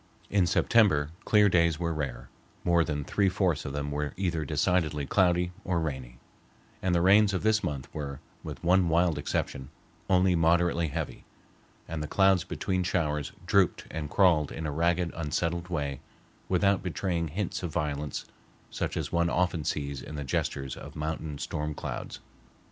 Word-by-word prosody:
In 100 -3 +3
September 80 -10 +3
clear 105 -1 +5
days 85 -4 +3
were 85 -1 -1
rare, 65 -5 -4 0.4
more 85 -1 +4
than 75 -3 -2
three 100 +6 +1
fourths 90 -5 0
of 70 - -4
them 70 0 -3
were 75 0 -3
either 90 -4 -1
decidedly 75 0 +1
cloudy 90 +2 +2
or 90 -3 0
rainy, 65 -6 -4 0.6
and 90 -1 +1
the 85 - +2
rains 100 +1 +5
of 90 - -2
this 110 0 +3
month 70 -3 -3
were, 70 -3 -5 0.2
with - - -7
one 90 0 +4
wild 85 -2 +2
exception, 65 -2 -3 0.4
only 95 0 +4
moderately 85 0 +3
heavy, 70 - -4 0.6
and 80 -1 -4
the 75 - -3
clouds 95 0 +4
between 95 -1 -2
showers 75 -6 -1
drooped - - +2
and 75 -2 -4
crawled 85 -5 +3
in 80 - -5
a 75 - -1
ragged, 85 +3 +1
unsettled 85 +2 -2
way 70 -6 -3 0.5
without 95 +1 +3
betraying 85 -2 -2
hints 90 +5 -3
of 90 -3 -4
violence 75 -1 -2 0.5
such - - -3
as - - -3
one 85 0 +2
often 90 -3 0
sees 70 -2 -3
in 75 - -8
the 70 - -4
gestures 70 0 -2
of - - -10
mountain 75 -1 -4
storm 75 +1 -3
clouds. - - -6
85 Hz, 165 wpm, -28 LUFS, 75-90 Hz, 0.6 s, clear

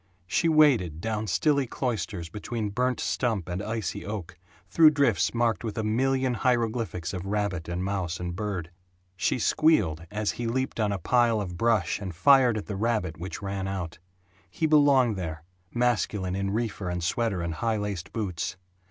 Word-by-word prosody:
She 165 - +1
waded 130 - +4
down 110 +2 -2
stilly 135 - +2
cloisters 100 -9 -3
between 105 +3 -4
burnt 125 +4 0
stump 110 -9 -1
and 90 +2 -3
icy 110 -3 -3
oak, 100 -5 -6 0.3
through 160 -2 +7
drifts 140 -8 +2
marked 115 -1 0
with 110 -2 -4
a 110 - 0
million 130 +4 +1
hieroglyphics 115 -7 -1
of 90 -2 -4
rabbit 100 -5 -2
and 90 +1 -2
mouse 95 -3 -2
and 90 -1 -4
bird. 95 -5 -4 0.4
She 90 - 0
squealed 105 - +2
as 105 +1 -1
he 120 0 -4
leaped 130 +1 -2
on 105 -2 +1
a 100 - -1
pile 115 +4 +2
of 90 -4 -4
brush 110 -3 +1
and 95 -4 -6
fired 125 - +5
at 105 - -4
the 105 - -5
rabbit 105 -6 -1
which 95 +3 -6
ran 100 -1 -3
out. 95 -4 -4 0.5
He 160 - -2
belonged 140 -7 +4
there, 80 -4 -5 0.3
masculine 105 -6 0
in 95 0 -1
reefer 105 -3 -2
and 90 -1 -3
sweater 100 0 0
and 85 -1 -2
high 110 +6 -1
laced 100 -4 -4
boots. 95 -5 -3
105 Hz, 170 wpm, -27 LUFS, 90-120 Hz, 0.5 s, through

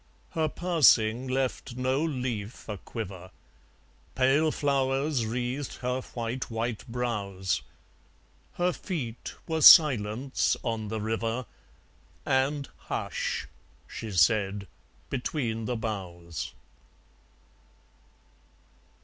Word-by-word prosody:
Her 160 -1 0
passing 130 -9 +4
left 130 -2 -2
no 130 +3 +1
leaf 125 -8 -3
a 105 - -4
quiver. 95 -5 -7 0.9
Pale 135 +4 +4
flowers 135 -2 +1
wreathed 125 +4 -3
her 125 +1 -1
white, 120 +2 -3
white 115 0 -2
brows. 105 -6 -2 0.9
Her 180 0 +1
feet 125 - -5
were 160 -1 -1
silence 130 - +6
on 115 -3 -2
the 110 +1 -3
river; 115 +3 -2 0.8
And 140 +2 +1
"Hush!" - - -3 0.4
she 110 - -6
said, 100 +2 +3 0.5
between 120 -4 -2
the 125 - -1
boughs. 90 -7 -5
120 Hz, 90 wpm, -28 LUFS, 110-135 Hz, 0.9 s, silence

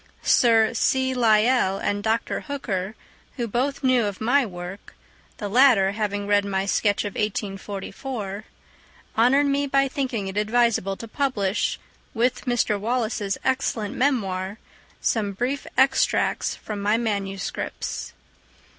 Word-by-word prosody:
Sir 225 -1 +4
C. 260 +3 +1
Lyell 225 -3 +3
and 205 +1 -1
Dr. 220 +2 0
Hooker, 215 -8 -4 0.4
who 240 -2 -1
both 260 +6 -1
knew 255 -3 +3
of 200 -2 -4
my 250 +3 +2
work—the 185 +3 -10
latter 225 -4 +5
having 205 -1 -2
read 205 0 +3
my 195 -1 -1
sketch 205 +1 +1
of 205 - -4
1844—honoured 210 +5 -3
me 280 0 +1
by 275 0 +3
thinking 255 -7 -3
it 190 +1 -5
advisable 215 -2 +2
to 230 - -8
publish, 220 -6 -1 0.4
with 245 +3 0
Mr. 240 -4 +1
Wallace's 215 -3 -1
excellent 255 -5 -1
memoir, 200 -7 0 0.4
some 205 -3 0
brief 250 +7 -2
extracts 265 0 +2
from 210 -2 -6
my 210 +2 +2
manuscripts. 200 -4 -3
220 Hz, 120 wpm, -24 LUFS, 200-255 Hz, 0.4 s, latter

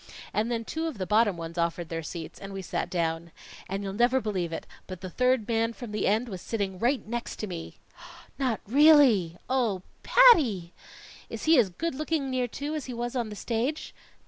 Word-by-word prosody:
And 215 +3 0
then 230 -1 -2
two 320 +6 -3
of 310 -8 -5
the 185 - -3
bottom 210 -1 +3
ones 165 +1 -6
offered 170 0 -1
their 165 0 -3
seats, 160 0 -7
and 195 - -8
we 195 0 -5
sat - - -3
down. 165 -1 -2 0.4
And 195 +1 -3
you'll 195 -1 -4
never 240 +5 +3
believe 190 -7 -2
it, - - -5 0.2
but 185 -2 -8
the 185 -2 -6
third 250 0 +2
man 230 0 +1
from 235 -2 -8
the 210 - -1
end 220 +5 +2
was 190 -5 -7
sitting 195 -5 -3
right 245 +5 +1
next 235 +2 -4
to - - -4
me!" 175 -5 -7 0.6
"Not 255 -5 0
really?" 255 - +5
"Oh, 235 -8 0 0.2
Patty!" 260 - +5 0.6
"Is - - -6
he 315 -3 +5
as 215 -6 +3
good 330 - -3
looking 300 -1 -2
near 255 -1 0
to, 285 +5 -5
as 305 -4 -3
he 250 - -6
was 240 +2 -3
on 235 -3 -1
the 210 - -7
stage?" 245 +8 -2
225 Hz, 205 wpm, -27 LUFS, 185-255 Hz, 0.6 s, really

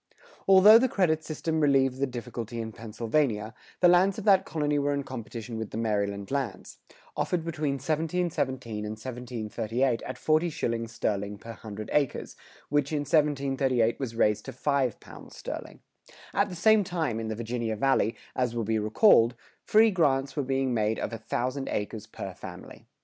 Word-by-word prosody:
[101:5] - - -26 0.2
Although 195 +3 +9
the 260 +1 +2
credit 160 -7 +1
system 160 +1 -2
relieved 135 -3 +3
the 140 - +1
difficulty 120 -1 -6
in 110 -1 -4
Pennsylvania, 115 0 -1 0.3
the 180 - +7
lands 180 +2 +4
of 215 - -5
that 195 -2 +5
colony 150 -2 0
were 145 0 +1
in 140 - -2
competition 115 -2 -7
with 110 - -4
the - - -6
Maryland 100 -2 -1
lands, 135 -4 -4 0.4
offered 170 -2 -1
between 155 -4 -1
1717 155 -6 -2
and 105 0 -4
1738 120 0 -2
at - - -6
forty 155 +2 +2
shillings 115 -6 -3
sterling 100 -2 -2
per 115 +3 -9
hundred 110 -2 -8
acres, 145 -3 0 0.3
which 145 0 +1
in 150 -2 0
1738 135 -5 +1
was 125 -4 -4
raised 105 -2 +2
to - - -6
five 135 -2 0
pounds - - -13
sterling.[101:6] - - -9 0.2
At 200 +1 +2
the 180 - -7
same 215 +4 +4
time, 160 - -2
in 110 - -4
the 110 - -3
Virginia 115 0 -3
Valley, 115 -1 +2 0.2
as 125 -2 0
will 115 - -1
be 110 +1 0
recalled, 115 - +5 0.3
free 220 +1 +5
grants 140 -7 +1
were 145 - 0
being 135 -1 0
made 110 -1 +1
of - - -4
a 115 - -5
thousand 130 +4 -2
acres 105 +1 -4
per 95 - -7
family. 90 0 -11
130 Hz, 170 wpm, -28 LUFS, 110-155 Hz, 0.4 s, Although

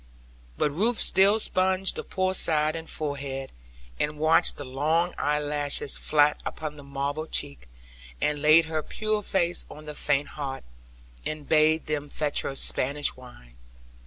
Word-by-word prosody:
But 150 - +1
Ruth 220 +10 0
still 200 +3 +5
sponged 190 -2 0
the - - -4
poor 185 0 -1
side 155 -3 +3
and 165 0 -7
forehead, 140 -3 -4 0.5
and 150 0 -1
watched 155 +2 +4
the 145 - -7
long 155 +7 0
eyelashes 145 -1 0
flat 150 -1 +2
upon 155 -1 -5
the 145 - -11
marble 140 +3 -4
cheek; 140 - -1 0.5
and 150 -1 -1
laid 155 +2 +6
her 160 -1 -2
pure 215 +5 -2
face 175 -3 +1
on 155 +1 -11
the 150 - -6
faint 145 -1 0
heart, 135 -3 -6 0.6
and 155 -2 -5
bade 155 0 +3
them 145 -1 -3
fetch 150 -1 0
her 135 - -4
Spanish 140 +2 +1
wine. 60 - -15
150 Hz, 150 wpm, -26 LUFS, 145-165 Hz, 0.6 s, laid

